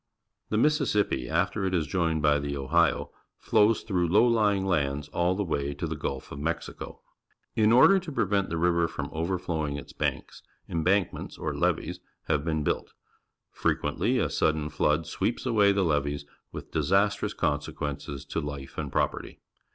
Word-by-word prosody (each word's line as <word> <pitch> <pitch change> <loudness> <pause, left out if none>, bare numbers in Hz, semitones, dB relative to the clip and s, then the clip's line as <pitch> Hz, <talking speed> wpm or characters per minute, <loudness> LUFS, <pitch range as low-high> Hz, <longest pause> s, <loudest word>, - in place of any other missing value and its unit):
The 105 - 0
Mississippi, 105 - +1
after - - 0
it 95 -1 0
is 80 -3 +1
joined 80 -3 0
by 75 -1 +4
the 70 0 -3
Ohio, 80 +4 +1 0.3
flows 110 -1 +3
through 90 -5 0
low 100 +8 +5
lying 105 -5 +2
lands 75 -5 0
all 85 +1 +1
the 100 +1 -1
waj^ 70 -3 -2
to 85 - -3
the 80 -1 -3
Gulf 70 -3 -5
of 70 - -7
]\Iexico. 85 +3 -4 0.5
In 110 -1 +4
order 160 +11 +7
to 175 -4 -8
prevent 100 -6 0
the 85 - -2
river 85 0 +2
from 75 -3 -5
overflowing 80 -3 -2
its 70 - -9
banks, - - -3 0.3
embankments, 90 +3 0
or - - -3
levees, - - -1 0.2
have 75 - 0
been 80 -2 -1
built. - - -2 0.6
Frequenth^ - - -1 0.2
a - - 0
sudden 75 -1 +1
flood 75 +2 +1
sweeps 110 +12 -2
awaj^ 105 -5 +4
the 100 - +2
levees, 70 -2 0 0.3
with - - -9
disastrous 100 +2 +1
consequences 75 -1 -3
to - - -3
life 70 -2 -6
and - - -4
property. - - -2
85 Hz, 160 wpm, -27 LUFS, 75-100 Hz, 0.6 s, order